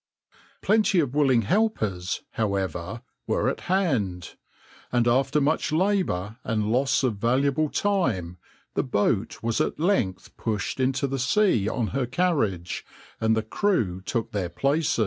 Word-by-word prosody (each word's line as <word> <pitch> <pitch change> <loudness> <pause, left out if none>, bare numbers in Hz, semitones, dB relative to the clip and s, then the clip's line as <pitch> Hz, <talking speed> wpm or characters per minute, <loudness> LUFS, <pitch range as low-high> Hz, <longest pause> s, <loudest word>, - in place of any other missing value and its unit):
Plenty 210 -3 +3
of 140 -6 0
willing 135 -5 +3
helpers, 105 - 0
however, 100 0 -2 0.2
were - - +1
at - - -3
hand, 120 - 0 0.6
and 120 -1 +2
after 135 +4 +3
much 150 +2 +1
labour 155 - 0
and 110 -2 -1
loss 135 +3 +2
of 120 -6 0
valuable 135 +7 +1
time, 115 - 0 0.3
the - - +1
boat 110 -3 0
was 115 -1 0
at - - -1
length 155 - 0
pushed 110 +3 -2
into 130 +1 +1
the 135 0 -2
sea 125 - +2
on 115 -2 -1
her 130 -2 -1
carriage, 125 - 0 0.4
and 110 0 +2
the 110 - 0
crew 110 - 0
took 115 +4 -3
their 95 -4 -2
places. 140 - 0
120 Hz, 140 wpm, -25 LUFS, 105-150 Hz, 0.6 s, Plenty